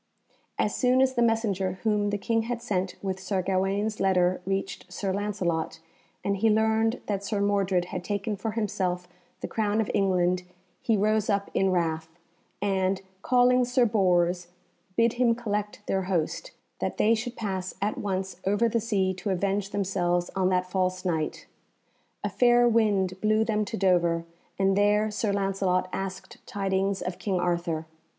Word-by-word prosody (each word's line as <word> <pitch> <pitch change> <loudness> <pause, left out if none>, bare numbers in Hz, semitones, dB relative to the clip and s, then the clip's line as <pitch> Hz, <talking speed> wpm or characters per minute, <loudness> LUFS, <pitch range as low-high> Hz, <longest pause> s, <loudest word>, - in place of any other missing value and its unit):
As 210 - +1
soon 255 0 +3
as 260 0 +3
the 240 - 0
messenger 215 -5 +1
whom 210 -2 +2
the 205 - -1
King 225 +3 0
had 235 +1 -3
sent 195 -5 -2
with 190 -1 -2
Sir 190 0 -1
Gawaine's 195 +3 0
letter 185 -1 +2
reached 195 -1 -3
Sir 190 +1 -2
Lancelot, 185 -6 -2 0.4
and 200 0 0
he 225 +3 +3
learned 220 +2 +2
that 200 -2 -2
Sir 205 0 -2
Mordred 195 -3 +1
had 180 - -3
taken 205 +2 -2
for 220 +2 -4
himself 185 -5 -1 0.3
the - - -3
crown 215 -1 0
of 220 - 0
England, 185 -2 +2 0.4
he 225 -2 +2
rose 215 +1 +1
up 200 -1 0
in 195 - +2
wrath, 160 -2 0 0.6
and, 190 -1 0 0.2
calling 250 +1 +4
Sir 250 0 +3
Bors, 180 -4 +2 0.5
bid 230 0 +4
him 240 -1 +3
collect 210 -3 -3
their 190 - 0
host, 185 - -1 0.3
that - - -2
they 220 - +4
should 240 +2 -3
pass 190 -4 -3
at 205 +2 -1
once 190 -2 -3
over 205 +4 +3
the 230 0 0
sea 195 -4 +1
to 185 +2 -5
avenge 195 +1 0
themselves 180 -3 0
on 190 -1 +2
that 180 -1 +1
false 185 0 -1
Knight. 160 -4 -2 0.8
A - - 0
fair 240 -1 +4
wind 200 -5 +2
blew 215 +1 +3
them 215 -1 0
to - - -5
Dover, 175 -3 +2 0.3
and 195 0 +2
there 210 +1 +3
Sir 210 0 -1
Lancelot 195 -2 0
asked 195 0 -5
tidings 195 -3 -1
of 180 0 -4
King 190 -3 -1
Arthur. 170 -2 -1
195 Hz, 165 wpm, -27 LUFS, 185-215 Hz, 0.8 s, calling